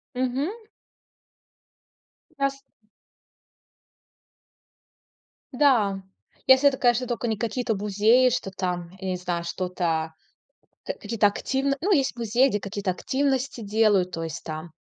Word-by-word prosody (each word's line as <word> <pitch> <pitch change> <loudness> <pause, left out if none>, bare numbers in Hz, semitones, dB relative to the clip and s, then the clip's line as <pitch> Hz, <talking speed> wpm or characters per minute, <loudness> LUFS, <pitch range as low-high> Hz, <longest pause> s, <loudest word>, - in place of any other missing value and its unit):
Мгм. 255 +5 -1 1.9
Раз. 275 0 -1 2.9
Да. 230 -8 +3 0.4
Если 265 +2 +7
это, 265 - -2
конечно, 245 0 +2
только 240 0 -3
не 220 - 0
какие-то 230 +1 -1
музеи, 210 +5 +3
что 235 -5 -2
там, 180 -2 -3
я 190 - -4
не 185 - -1
знаю, 175 -1 -3
что-то 170 -2 -2 0.7
ка - - -2
какие-то 210 -1 +1
активно 270 +6 -1
ну, 400 - 0
есть 275 -9 +2
музеи, 240 +3 +2
где 205 - -1
какие-то 200 -1 -3
активности 265 +3 -1
делают. 205 -3 +2
То 165 - -4
есть 160 -3 -6
там 155 +1 -7
220 Hz, 115 wpm, -25 LUFS, 185-255 Hz, 2.9 s, Если